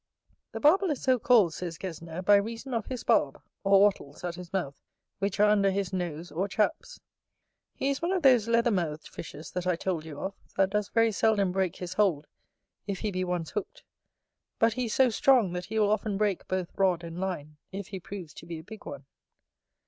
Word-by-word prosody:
The -, -, -4 dB
Barbel 370 Hz, +6 st, +4 dB
is 295 Hz, -, -1 dB
so 255 Hz, -2 st, +3 dB
called, 215 Hz, -8 st, +4 dB
says 170 Hz, -2 st, -5 dB
Gesner, 170 Hz, -1 st, -6 dB
by 205 Hz, -, +7 dB
reason 230 Hz, +5 st, -4 dB
of 230 Hz, -3 st, -2 dB
his 255 Hz, -3 st, -5 dB
barb 135 Hz, -, +2 dB, 0.2 s
or 195 Hz, 0 st, +5 dB
wattles 190 Hz, -7 st, +1 dB
at 175 Hz, -1 st, -2 dB
his 175 Hz, 0 st, -10 dB
mouth, 170 Hz, -8 st, -3 dB, 0.4 s
which 200 Hz, 0 st, -2 dB
are 210 Hz, -, +6 dB
under 205 Hz, -2 st, +4 dB
his 195 Hz, -1 st, -2 dB
nose 175 Hz, -3 st, -4 dB
or 180 Hz, +6 st, -1 dB
chaps. 315 Hz, -, -1 dB, 0.8 s
He 275 Hz, -, 0 dB
is 275 Hz, -, -3 dB
one 340 Hz, +2 st, 0 dB
of 375 Hz, -3 st, 0 dB
those 250 Hz, -5 st, +5 dB
leather 235 Hz, +1 st, +3 dB
mouthed 160 Hz, -6 st, -2 dB
fishes 155 Hz, -1 st, -9 dB
that 180 Hz, 0 st, -3 dB
I 180 Hz, -, +3 dB
told 170 Hz, -2 st, -2 dB
you 155 Hz, -3 st, -8 dB
of, 195 Hz, -, -3 dB, 0.2 s
that 195 Hz, 0 st, +3 dB
does 210 Hz, -1 st, 0 dB
very 230 Hz, 0 st, +3 dB
seldom 205 Hz, -3 st, +2 dB
break 190 Hz, -2 st, 0 dB
his 180 Hz, 0 st, -6 dB
hold 185 Hz, -7 st, +2 dB, 0.6 s
if 195 Hz, -2 st, -3 dB
he 210 Hz, -, -1 dB
be 185 Hz, -1 st, -1 dB
once 180 Hz, -3 st, -2 dB
hooked: 210 Hz, -3 st, -5 dB, 0.7 s
but 225 Hz, 0 st, +3 dB
he 250 Hz, +1 st, -2 dB
is 220 Hz, -, -3 dB
so 260 Hz, -2 st, +4 dB
strong, 230 Hz, -5 st, +4 dB
that 180 Hz, 0 st, -4 dB
he 220 Hz, +3 st, -4 dB
will 210 Hz, -1 st, +3 dB
often 210 Hz, -1 st, 0 dB
break 205 Hz, -3 st, 0 dB
both 185 Hz, -2 st, -2 dB
rod 185 Hz, -3 st, +2 dB
and 170 Hz, +1 st, -7 dB
line, 155 Hz, -6 st, -4 dB
if 195 Hz, +1 st, -6 dB
he 195 Hz, -2 st, -5 dB
proves 180 Hz, -4 st, -8 dB
to -, -, -12 dB
be 170 Hz, -1 st, -5 dB
a 160 Hz, -, -9 dB
big 215 Hz, +4 st, -11 dB
one. 140 Hz, -1 st, -8 dB
195 Hz, 215 wpm, -28 LUFS, 175-220 Hz, 0.8 s, by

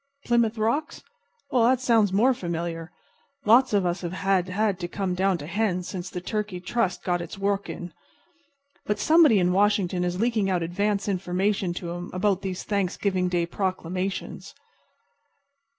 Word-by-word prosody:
Plymouth 235 Hz, -2 st, +2 dB
Rocks? 260 Hz, +9 st, -1 dB, 0.5 s
Well, 240 Hz, -3 st, +4 dB
that 255 Hz, +1 st, +4 dB
sounds 230 Hz, -6 st, +3 dB
more 230 Hz, +7 st, +4 dB
familiar. 170 Hz, -4 st, -4 dB, 0.5 s
Lots 245 Hz, +5 st, +5 dB
of 200 Hz, -3 st, +2 dB
us 175 Hz, +1 st, -1 dB
have 175 Hz, -1 st, -4 dB
had 190 Hz, +1 st, 0 dB
to 175 Hz, -, -3 dB
come 190 Hz, 0 st, -2 dB
down 190 Hz, 0 st, +1 dB
to 145 Hz, -, -8 dB
hens 180 Hz, 0 st, -1 dB
since 180 Hz, -2 st, -5 dB
the 180 Hz, -, -5 dB
Turkey 210 Hz, 0 st, -3 dB
Trust 190 Hz, +1 st, -1 dB
got 175 Hz, -1 st, 0 dB
its 170 Hz, -, -7 dB
work 200 Hz, 0 st, -1 dB
in. 175 Hz, -2 st, -7 dB, 0.9 s
But 210 Hz, -, 0 dB
somebody 310 Hz, +1 st, +5 dB
in 180 Hz, -1 st, +2 dB
Washington 195 Hz, -2 st, +2 dB
is 180 Hz, +1 st, -2 dB
leaking 220 Hz, -3 st, +1 dB
out 180 Hz, -2 st, 0 dB
advance 200 Hz, +4 st, -1 dB
information 190 Hz, 0 st, 0 dB
to 170 Hz, -1 st, -5 dB
'em 175 Hz, 0 st, -6 dB
about 195 Hz, 0 st, +1 dB
these 190 Hz, -2 st, -4 dB
Thanksgiving 190 Hz, -2 st, 0 dB, 0.2 s
proclamations. 185 Hz, +1 st, -4 dB
195 Hz, 150 wpm, -25 LUFS, 180-210 Hz, 0.9 s, Lots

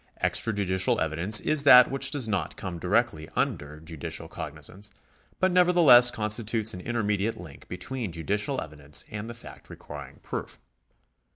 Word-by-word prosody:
Extrajudicial 95 Hz, -4 st, 0 dB
evidence 85 Hz, +7 st, +4 dB
is 155 Hz, -1 st, +2 dB
that 125 Hz, -3 st, +7 dB
which 135 Hz, -, +1 dB
does 140 Hz, -6 st, -1 dB
not 105 Hz, -4 st, -3 dB
come 90 Hz, -3 st, -7 dB
directly 90 Hz, -4 st, -1 dB
under 75 Hz, +1 st, -3 dB
judicial 80 Hz, -1 st, -7 dB
cognizance, 75 Hz, +8 st, -8 dB, 0.5 s
but 185 Hz, 0 st, +1 dB
nevertheless 175 Hz, -9 st, +6 dB
constitutes 110 Hz, -1 st, -1 dB
an 90 Hz, -, -8 dB
intermediate 105 Hz, -2 st, -2 dB
link 80 Hz, -6 st, -13 dB
between 125 Hz, -7 st, -5 dB
judicial 105 Hz, -, -2 dB
evidence 75 Hz, -1 st, -4 dB
and 110 Hz, +2 st, -7 dB
the 120 Hz, -, -8 dB
fact 115 Hz, -, -14 dB
requiring -, -, -11 dB
proof. -, -, -7 dB
105 Hz, 135 wpm, -26 LUFS, 85-120 Hz, 0.5 s, that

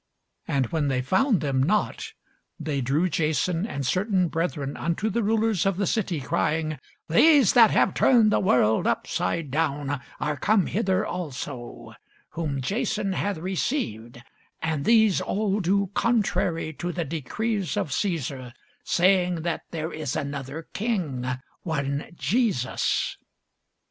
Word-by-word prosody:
And 135 Hz, -2 st, +1 dB
when 155 Hz, -3 st, 0 dB
they 130 Hz, -2 st, 0 dB
found 205 Hz, -, +2 dB
them 135 Hz, -3 st, 0 dB
not, 205 Hz, +10 st, 0 dB, 0.5 s
they 150 Hz, -3 st, -2 dB
drew 140 Hz, +8 st, +1 dB
Jason 165 Hz, +3 st, 0 dB
and 140 Hz, -, -4 dB
certain 185 Hz, -, +1 dB
brethren 155 Hz, -4 st, -2 dB
unto 170 Hz, +6 st, -1 dB
the 235 Hz, -, 0 dB
rulers 220 Hz, -2 st, +1 dB
of 195 Hz, -2 st, +1 dB
the 200 Hz, -, +1 dB
city, 185 Hz, -6 st, -1 dB
crying, 155 Hz, +4 st, -1 dB, 0.3 s
These 280 Hz, -, +5 dB
that 230 Hz, -3 st, +7 dB
have -, -, +3 dB
turned 230 Hz, -5 st, +4 dB
the -, -, +3 dB
world 110 Hz, -, +3 dB
upside 160 Hz, -5 st, -1 dB
down 145 Hz, -2 st, -1 dB, 0.2 s
are 150 Hz, -1 st, -1 dB
come 205 Hz, +6 st, +2 dB
hither 195 Hz, -1 st, 0 dB
also; 145 Hz, -, -6 dB, 0.4 s
whom 145 Hz, -5 st, -3 dB
Jason 205 Hz, -, -1 dB
hath 200 Hz, 0 st, -1 dB
received: 165 Hz, -, -3 dB, 0.4 s
and 155 Hz, -3 st, -2 dB
these 220 Hz, -4 st, +4 dB
all 205 Hz, 0 st, 0 dB
do 200 Hz, +1 st, +1 dB
contrary 195 Hz, -9 st, 0 dB
to 175 Hz, 0 st, -2 dB
the 175 Hz, -1 st, -3 dB
decrees 195 Hz, -, -2 dB
of 190 Hz, -8 st, -1 dB
Cæsar, 135 Hz, -, -2 dB, 0.3 s
saying 180 Hz, -2 st, +2 dB
that 170 Hz, -1 st, -2 dB
there 160 Hz, 0 st, -4 dB
is 150 Hz, -5 st, -3 dB
another 140 Hz, +2 st, -5 dB
king, 175 Hz, -, -2 dB, 0.3 s
one 140 Hz, -3 st, -2 dB
Jesus. 200 Hz, -, 0 dB
170 Hz, 135 wpm, -25 LUFS, 140-200 Hz, 0.5 s, that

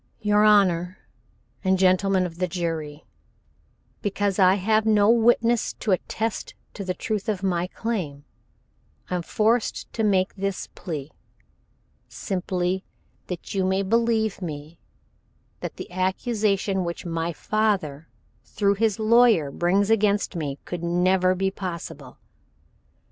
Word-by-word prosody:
"Your 210 Hz, -1 st, +3 dB
Honor, 185 Hz, -4 st, +3 dB, 0.7 s
and 190 Hz, -1 st, +3 dB
Gentlemen 185 Hz, 0 st, +3 dB
of 170 Hz, -1 st, -7 dB
the 180 Hz, -, +1 dB
Jury, 160 Hz, -4 st, -4 dB, 1.0 s
Because 205 Hz, -1 st, -1 dB
I 185 Hz, 0 st, +6 dB
have 215 Hz, +3 st, +2 dB
no 215 Hz, -1 st, +4 dB
witness 235 Hz, 0 st, +3 dB
to 210 Hz, -, -3 dB
attest 220 Hz, +4 st, -2 dB, 0.2 s
to 200 Hz, -, -6 dB
the 185 Hz, -1 st, -3 dB
truth 215 Hz, 0 st, -3 dB
of 200 Hz, -3 st, -2 dB
my 180 Hz, -2 st, 0 dB
claim, 180 Hz, -11 st, -4 dB, 0.9 s
I -, -, +1 dB
am -, -, -2 dB
forced 220 Hz, +6 st, 0 dB
to 225 Hz, -, -1 dB
make 190 Hz, -3 st, +2 dB
this 195 Hz, -1 st, -3 dB
plea, 150 Hz, -4 st, -6 dB, 1.0 s
simply 185 Hz, -1 st, -2 dB, 0.4 s
that 180 Hz, -2 st, -6 dB
you 195 Hz, -1 st, +1 dB
may 190 Hz, +1 st, +1 dB
believe 220 Hz, 0 st, +1 dB
me, 155 Hz, -1 st, -7 dB, 0.8 s
that -, -, -6 dB
the -, -, -9 dB
accusation 195 Hz, +1 st, 0 dB
which 170 Hz, 0 st, -5 dB
my 165 Hz, 0 st, -2 dB
father 185 Hz, -6 st, -1 dB, 0.4 s
through 200 Hz, -1 st, +1 dB
his 220 Hz, -3 st, +2 dB
lawyer 220 Hz, -9 st, +4 dB
brings 195 Hz, +7 st, +1 dB
against 205 Hz, -3 st, +2 dB
me 145 Hz, -4 st, -3 dB
could 175 Hz, -2 st, -5 dB
never 185 Hz, +2 st, +2 dB
be 190 Hz, +1 st, 0 dB
possible. 180 Hz, -4 st, -7 dB
190 Hz, 125 wpm, -24 LUFS, 175-210 Hz, 1.0 s, I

